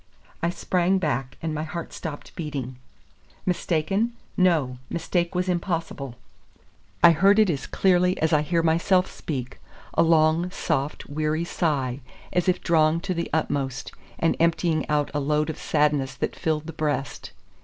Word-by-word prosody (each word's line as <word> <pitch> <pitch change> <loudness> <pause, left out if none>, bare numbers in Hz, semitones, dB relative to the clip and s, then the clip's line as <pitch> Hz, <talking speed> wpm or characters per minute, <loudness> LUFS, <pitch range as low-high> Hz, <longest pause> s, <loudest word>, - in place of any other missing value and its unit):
I 170 - +1
sprang 180 +1 +1
back, 135 -7 -2
and 160 -1 -1
my 155 - -2
heart 165 +2 -5
stopped 155 -4 -7
beating. 135 -6 -4 0.7
Mistaken! 185 +5 0 0.2
no, 155 -9 +2
mistake 170 +1 -1
was 180 +1 0
impossible. 165 -7 -2 0.9
I 170 - +10
heard 195 +6 +4
it 215 -4 +5
as 140 -4 -4
clearly 180 -1 +2
as 160 0 +1
I 150 - +5
hear 165 +2 0
myself 170 +3 +3
speak; 130 -5 -5 0.3
a - - +3
long, 165 +1 +4
soft, 150 -6 -2
weary 155 +2 -1
sigh, 140 -7 -1 0.3
as 180 0 +2
if 180 0 +1
drawn 160 -1 +3
to 190 0 -2
the 170 -1 -3
utmost, 135 -4 -1 0.3
and 165 - +2
emptying 165 -1 +1
out 150 -1 +1
a 145 - 0
load 150 +2 +1
of - - -10
sadness 145 -4 +1
that - - -3
filled 155 -1 -1
the 165 - -7
breast. 145 -4 -2
160 Hz, 155 wpm, -25 LUFS, 150-175 Hz, 0.9 s, I